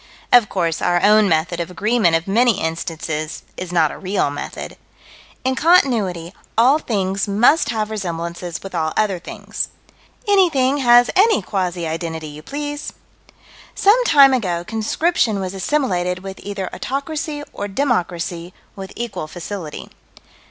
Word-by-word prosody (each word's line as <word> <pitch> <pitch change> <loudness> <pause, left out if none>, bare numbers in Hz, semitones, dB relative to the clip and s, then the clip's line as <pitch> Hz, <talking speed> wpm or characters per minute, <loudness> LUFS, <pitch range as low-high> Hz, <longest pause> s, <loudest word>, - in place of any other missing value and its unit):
Of 240 -4 +6
course 165 -1 -1
our 175 0 +2
own 210 0 +5
method 165 +2 0
of 170 0 -3
agreement 200 -1 +2
of 165 +2 -1
many 230 +3 +3
instances 160 -1 -4
is 180 -1 -6
not 165 -4 +3
a - - -9
real 190 -6 0
method. 145 - -7 0.7
In 260 +1 +1
Continuity, 220 - +2 0.2
all 260 +6 +5
things 195 -6 -1
must 230 +11 +3
have 220 -2 -2
resemblances 170 -3 -5
with 195 - -8
all 160 -2 -1
other 200 -4 +1
things. - - -5 0.6
Anything 320 -10 +3
has 245 -2 +5
any 425 +3 +4
quasi 180 -4 -2
identity 160 -1 -4
you 150 +1 -10
please. 290 - -5 0.8
Some 440 +5 +4
time 280 - +7
ago 180 -9 -1
conscription 225 - 0
was 185 -1 -4
assimilated 185 -5 -1
with 195 0 -8
either 200 -2 -4
autocracy 290 +2 -4
or 205 - -4
democracy 180 -7 -2 0.2
with 195 -1 -8
equal 235 -9 -5
facility. 175 -1 -7
195 Hz, 140 wpm, -20 LUFS, 170-250 Hz, 0.8 s, time